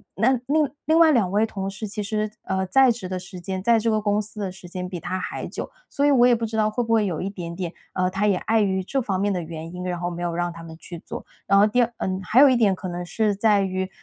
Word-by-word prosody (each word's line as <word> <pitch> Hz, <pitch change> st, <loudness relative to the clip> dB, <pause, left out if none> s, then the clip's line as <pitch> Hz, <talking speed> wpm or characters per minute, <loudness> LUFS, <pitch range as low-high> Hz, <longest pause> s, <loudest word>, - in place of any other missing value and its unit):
那 230 Hz, +6 st, +3 dB
另 295 Hz, +1 st, +2 dB, 0.2 s
另 320 Hz, +1 st, +4 dB
外 320 Hz, -2 st, +7 dB
2 205 Hz, -9 st, +2 dB
位 210 Hz, +2 st, +3 dB
同 195 Hz, -3 st, -4 dB
事 200 Hz, +2 st, -6 dB
其 210 Hz, +1 st, -4 dB
实， 215 Hz, 0 st, -1 dB
呃， 190 Hz, 0 st, -1 dB
在 265 Hz, +3 st, +5 dB
职 220 Hz, -5 st, -5 dB
的 185 Hz, -, -2 dB
时 180 Hz, 0 st, -9 dB
间， 185 Hz, +1 st, -4 dB
在 230 Hz, +1 st, +4 dB
这 230 Hz, -, 0 dB
个 215 Hz, -1 st, +1 dB
公 205 Hz, 0 st, +1 dB
司 210 Hz, 0 st, -8 dB
的 190 Hz, -, -2 dB
时 180 Hz, -1 st, -12 dB
间 180 Hz, +1 st, -5 dB
比 180 Hz, -2 st, -5 dB
他 185 Hz, +3 st, -3 dB
还 -, -, -5 dB
久。 -, -, -6 dB, 0.2 s
所 285 Hz, -, 0 dB
以 290 Hz, -, +5 dB
我 245 Hz, -2 st, +6 dB
也 245 Hz, -, +5 dB
不 230 Hz, -, -2 dB
知 220 Hz, 0 st, -4 dB
道 215 Hz, -1 st, +3 dB
会 240 Hz, +3 st, -1 dB
不 230 Hz, 0 st, 0 dB
会 215 Hz, -2 st, +3 dB
有 170 Hz, -5 st, -2 dB
一 195 Hz, -, -2 dB
点 170 Hz, -4 st, -7 dB
点， 175 Hz, -2 st, -4 dB, 0.2 s
呃， 185 Hz, 0 st, +1 dB
他 195 Hz, +3 st, 0 dB
也 200 Hz, -, +3 dB
碍 225 Hz, +3 st, +1 dB
于 190 Hz, -2 st, 0 dB
这 270 Hz, +8 st, -1 dB
方 195 Hz, -5 st, -1 dB
面 205 Hz, +1 st, +1 dB
的 180 Hz, -, -2 dB
原 165 Hz, +1 st, -7 dB
因， 180 Hz, -, -6 dB
然 180 Hz, -1 st, -2 dB
后 175 Hz, 0 st, -2 dB
没 175 Hz, -, -6 dB
有 170 Hz, -1 st, -2 dB
让 175 Hz, 0 st, -1 dB
他 165 Hz, -, -10 dB
们 160 Hz, -1 st, -10 dB
去 170 Hz, 0 st, -9 dB
做。 -, -, -8 dB, 0.2 s
然 195 Hz, -, +5 dB
后 200 Hz, -, +7 dB
第 245 Hz, +4 st, +2 dB
二 240 Hz, 0 st, +1 dB
嗯， 185 Hz, 0 st, -2 dB
还 220 Hz, +8 st, +4 dB
有 285 Hz, -, +8 dB
一 255 Hz, -, +4 dB
点 205 Hz, -5 st, +3 dB
可 185 Hz, 0 st, -7 dB
能 175 Hz, 0 st, -4 dB
是 210 Hz, +2 st, 0 dB
在 205 Hz, -1 st, +3 dB
于 190 Hz, 0 st, -2 dB
200 Hz, 320 characters per minute, -24 LUFS, 185-225 Hz, 0.2 s, 有